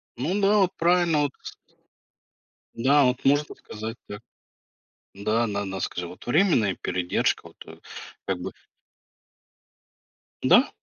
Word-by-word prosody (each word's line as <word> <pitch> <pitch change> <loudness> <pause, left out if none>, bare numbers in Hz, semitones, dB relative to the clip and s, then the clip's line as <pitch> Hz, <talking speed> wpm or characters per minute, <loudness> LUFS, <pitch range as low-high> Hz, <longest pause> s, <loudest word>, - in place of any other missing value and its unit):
Ну 180 +11 -1
да, 200 +2 +4
вот 185 -2 +3
правильно, 175 0 +3
да, - - +3
вот 140 - -1
с - - -8 1.2
Да 140 +4 +4
вот. 125 0 0
Можно 145 +2 +2
сказать 110 +2 -8
так. 105 +1 -8 0.9
Да, 110 +4 0
на 100 -1 -3
на 95 -1 -5
скажи 90 -1 -3
вот, 90 - -12
временная 120 - +2
передержка, 90 -1 -1
вот, - - -19
э, - - -12 0.5
как 95 -2 -2
бы 95 +2 -5 1.9
Да, - - +5
120 Hz, 135 wpm, -25 LUFS, 100-160 Hz, 1.9 s, Да